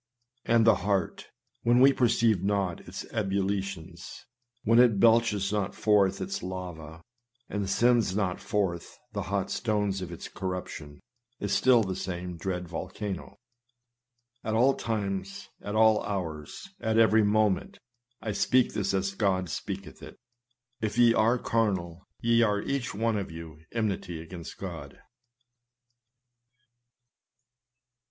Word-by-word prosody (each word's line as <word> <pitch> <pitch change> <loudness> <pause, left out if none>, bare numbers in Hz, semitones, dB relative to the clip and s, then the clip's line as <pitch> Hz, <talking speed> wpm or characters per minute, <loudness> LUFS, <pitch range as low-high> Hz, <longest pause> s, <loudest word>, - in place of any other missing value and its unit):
And 115 -1 +4
the 115 - +6
heart, 100 -1 -1 0.3
when 120 +1 +4
we 135 +2 +7
perceive 115 -6 +2
not 95 -3 0
its - - -6
ebullitions, 95 -4 -3 0.4
when 115 +2 +4
it 120 -5 +5
belches 110 -3 +3
not 100 -2 -1
forth 100 -3 +3
its 195 +1 -4
lava, 85 -4 -7 0.4
and 100 -2 -3
sendeth 120 -3 +3
not 95 -4 -1
forth 95 -5 -2 0.2
the - - -2
hot - - -2
stones 105 -3 -1
of 90 -2 -6
its 85 - -7
corruption, 90 -6 -6 0.4
is - - -2
still 125 -3 +5
the 95 -2 -3
same 90 -1 -5
dread 90 +1 -4
volcano. 95 +3 -5 1.1
At 110 0 -1
all 130 +4 +5
times, 100 -5 -3
at 105 - -5
all 110 -1 +5
hours, 80 - -5
at 110 -1 0
every 110 -1 +5
moment, 105 -1 +1 0.5
(I 110 - -2
speak 125 +5 +2
this 100 -2 0
as 95 +1 -1
God 95 -4 0
speaketh 100 +1 -6
it,) - - -11 0.6
if 110 +1 -2
ye 120 -1 +6
are 115 +2 +3
carnal, 95 -8 -1
ye 115 0 +3
are 105 -3 +2
each 135 -6 -2
one 115 +1 0
of 100 - -3
you 80 -2 -9
enmity 100 -6 -2
against 85 +1 -9
God. - - -8
100 Hz, 130 wpm, -28 LUFS, 95-110 Hz, 1.1 s, we